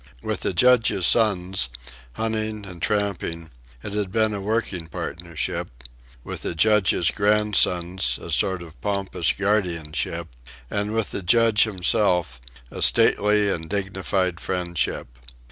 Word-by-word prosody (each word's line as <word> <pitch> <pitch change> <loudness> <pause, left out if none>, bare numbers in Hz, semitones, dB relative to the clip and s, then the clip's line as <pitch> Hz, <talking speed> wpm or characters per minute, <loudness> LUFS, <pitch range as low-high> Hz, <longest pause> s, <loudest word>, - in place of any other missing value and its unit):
With - - -2
the - - -1
Judge's 110 -2 +3
sons, 95 - +2 0.4
hunting 110 - -3
and 90 -3 -10
tramping, 100 -6 -2 0.3
it 105 - -6
had 105 -3 -2
been 110 0 +1
a 100 - -4
working 100 -5 -2
partnership; 85 0 -4 0.6
with - - -7
the - - -4
Judge's 105 -2 +3
grandsons, 95 - +1
a - - -8
sort 95 -2 +1
of 80 -2 -15
pompous 100 -4 -1
guardianship; 90 -7 -1 0.4
and 105 +1 -2
with 115 -2 -1
the - - -3
Judge 110 +4 +4
himself, 90 - 0 0.3
a - - -7
stately 105 0 +4
and 80 -3 -4
dignified 95 -2 -1
friendship. 85 -9 -2
95 Hz, 125 wpm, -23 LUFS, 85-105 Hz, 0.6 s, Judge